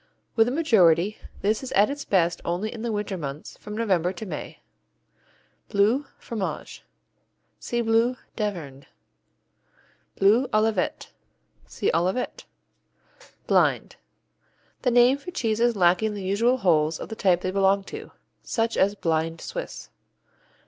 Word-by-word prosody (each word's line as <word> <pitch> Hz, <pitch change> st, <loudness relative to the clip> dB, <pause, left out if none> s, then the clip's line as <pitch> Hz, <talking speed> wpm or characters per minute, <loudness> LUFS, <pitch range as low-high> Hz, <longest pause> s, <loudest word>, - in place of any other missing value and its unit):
With 225 Hz, 0 st, +4 dB
the -, -, 0 dB
majority, 210 Hz, -, +3 dB, 0.2 s
this 210 Hz, +2 st, +1 dB
is 265 Hz, -, -7 dB
at 205 Hz, +6 st, +4 dB
its 285 Hz, 0 st, -6 dB
best 175 Hz, -3 st, +1 dB
only 180 Hz, +6 st, -2 dB
in 225 Hz, -, -7 dB
the 235 Hz, 0 st, -2 dB
winter 205 Hz, -3 st, -3 dB
months, 140 Hz, 0 st, -7 dB
from 210 Hz, 0 st, -8 dB
November 185 Hz, -6 st, +1 dB
to 190 Hz, +4 st, -8 dB
May. 190 Hz, -, -7 dB, 1.1 s
Bleu, 225 Hz, +8 st, +2 dB
Fromage 215 Hz, -5 st, -5 dB, 0.8 s
see 240 Hz, 0 st, -2 dB
Bleu 230 Hz, +2 st, +2 dB, 0.2 s
d'Auvergne. 165 Hz, -, -4 dB, 1.3 s
Bleu 220 Hz, +7 st, +4 dB
Olivet 215 Hz, -3 st, 0 dB, 0.6 s
see -, -, -1 dB
Olivet. 180 Hz, +9 st, -1 dB, 1.0 s
Blind -, -, +2 dB, 0.8 s
The 255 Hz, -, +2 dB
name 245 Hz, +3 st, +5 dB
for 285 Hz, -, -8 dB
cheeses 235 Hz, -6 st, +1 dB
lacking 185 Hz, +3 st, +2 dB
the 200 Hz, -, -6 dB
usual 225 Hz, +7 st, +2 dB
holes 160 Hz, -7 st, +2 dB
of -, -, -7 dB
the 220 Hz, -, -5 dB
type 180 Hz, -4 st, +2 dB
they 185 Hz, -, -2 dB
belong 195 Hz, 0 st, +2 dB
to, -, -, -9 dB, 0.3 s
such 230 Hz, -1 st, -1 dB
as 200 Hz, +2 st, +3 dB
blind 165 Hz, -2 st, -1 dB
Swiss. 60 Hz, 0 st, -7 dB
205 Hz, 130 wpm, -25 LUFS, 180-230 Hz, 1.3 s, name